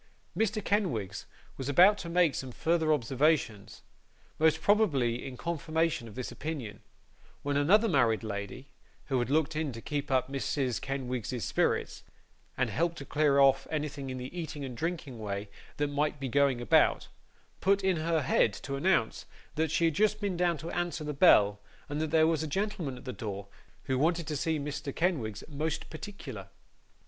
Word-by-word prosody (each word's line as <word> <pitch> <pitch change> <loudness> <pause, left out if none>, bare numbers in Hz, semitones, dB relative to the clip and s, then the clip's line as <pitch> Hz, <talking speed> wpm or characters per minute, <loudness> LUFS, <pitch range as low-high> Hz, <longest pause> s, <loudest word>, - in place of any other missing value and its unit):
Mr. 215 -1 0
Kenwigs 145 - -1 0.3
was 135 +1 -4
about 180 +8 +7
to 170 - -6
make 170 -3 +3
some 130 -1 -5
further 160 +4 +1
observations, 135 -5 0 0.6
most 160 0 +4
probably 145 - +2
in 130 -2 -7
confirmation 160 -4 -1
of 105 - -12
this 130 -1 -5
opinion, 130 -10 -6 0.6
when 145 0 -1
another 195 +11 +4
married 120 - +2
lady, 105 +5 -5 0.4
who 130 -2 +2
had 120 - -1
looked 155 +2 +1
in 155 -2 -1
to 115 - -8
keep 145 +4 -4
up 130 -2 +2
Mrs. 135 -2 -2
Kenwigs's 125 -4 -3
spirits, - - 0 0.6
and - - 0
help 170 +1 0
to 140 - -8
clear 145 -1 +2
off 135 -1 +4
anything 145 -3 -3
in 130 - -4
the 125 +6 -7
eating 155 -4 -5
and 125 -2 -7
drinking 155 -5 -4
way 100 -1 -4 0.3
that 145 - +1
might 145 +1 -1
be 135 - -3
going 140 -2 +2
about, 120 - +3 0.5
put 195 0 +2
in 190 -2 +2
her 160 -1 0
head 115 -4 +3
to 140 +7 -5
announce 140 -6 +1 0.3
that 160 +1 0
she 165 - +2
had 165 - +2
just 210 +5 +2
been 200 -3 -1
down 175 -1 +1
to 160 +4 -6
answer 175 -2 -2
the 150 0 -3
bell, 105 - +5 0.3
and 145 +1 -3
that 160 - -1
there 160 0 +4
was 160 -1 +1
a 160 - -2
gentleman 185 -5 -2
at - - -13
the 125 - -4
door 100 -4 -6 0.3
who 130 -1 -1
wanted 170 +3 +1
to 150 - -3
see 160 +2 0
Mr. 145 -1 -5
Kenwigs 130 - -1
'most 155 +2 -3
particular. 155 - -8
145 Hz, 175 wpm, -30 LUFS, 130-165 Hz, 0.6 s, about